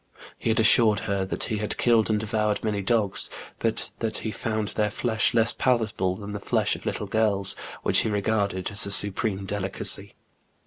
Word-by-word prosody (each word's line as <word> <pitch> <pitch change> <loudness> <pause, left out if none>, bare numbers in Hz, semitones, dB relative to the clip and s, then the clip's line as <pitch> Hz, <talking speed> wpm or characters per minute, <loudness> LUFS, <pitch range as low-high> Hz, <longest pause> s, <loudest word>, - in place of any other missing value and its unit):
He - - -2
had 110 - +1
assured 110 -2 +5
her 100 -2 -2
that - - -2
he 110 -3 -3
had 105 - -4
killed 115 -3 +2
and 105 -1 +1
devoured 105 -1 -2
many 105 -2 -2
dogs, 105 -1 0 0.3
but 115 0 -1
that 110 -2 -1
he 110 - -4
found 110 -1 -3
their 105 -1 -1
flesh 110 +1 0
less 115 0 +3
palatable 110 -7 0
than 100 +1 -8
the 105 - -5
flesh - - 0
of - - -10
little - - -3
girls, 100 -3 0 0.3
which - - +4
he - - 0
regarded 100 -2 -1
as 100 0 +4
a - - -2
supreme 100 0 +5
delicacy. 100 -1 -3
105 Hz, 185 wpm, -25 LUFS, 100-110 Hz, 0.3 s, assured